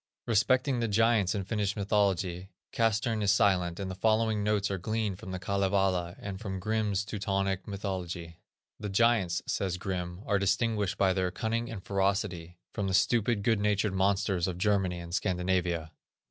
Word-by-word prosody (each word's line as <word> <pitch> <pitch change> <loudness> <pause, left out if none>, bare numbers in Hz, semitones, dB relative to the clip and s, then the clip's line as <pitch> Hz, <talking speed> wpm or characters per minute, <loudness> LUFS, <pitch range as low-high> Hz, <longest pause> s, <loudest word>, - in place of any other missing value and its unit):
Respecting 125 +4 +2
the 115 - 0
giants 110 -2 +3
of 95 -2 -3
Finnish 105 -2 -1
mythology, 95 -3 0 0.2
Castrén 115 0 +1
is 100 -2 +3
silent, 95 -4 +2
and 95 -1 -3
the - - -4
following 110 +1 +1
notes 105 -1 +1
are 95 - -2
gleaned 110 -1 -2
from 110 - -9
the 95 - -3
Kalevala, 95 -2 0
and 100 -2 -6
from 95 -4 -4
Grimm's 105 0 0
Teutonic 100 -2 -2
Mythology. 90 -4 -5 0.4
"The 105 - -4
giants," 100 -4 +2
says 95 -2 -1
Grimm, 90 0 -4
"are 100 -1 +1
distinguished 100 0 0
by 95 -1 +3
their 95 -1 0
cunning 115 +4 -2
and 100 -5 -7
ferocity 95 -3 -1 0.2
from 100 - -2
the 95 - +1
stupid, 115 0 +2
good 115 -1 +2
natured 105 -1 +1
monsters 95 -1 +1
of 90 -2 -3
Germany 95 -2 +1
and 85 0 -8
Scandinavia." 90 -4 0
100 Hz, 160 wpm, -29 LUFS, 95-105 Hz, 0.4 s, giants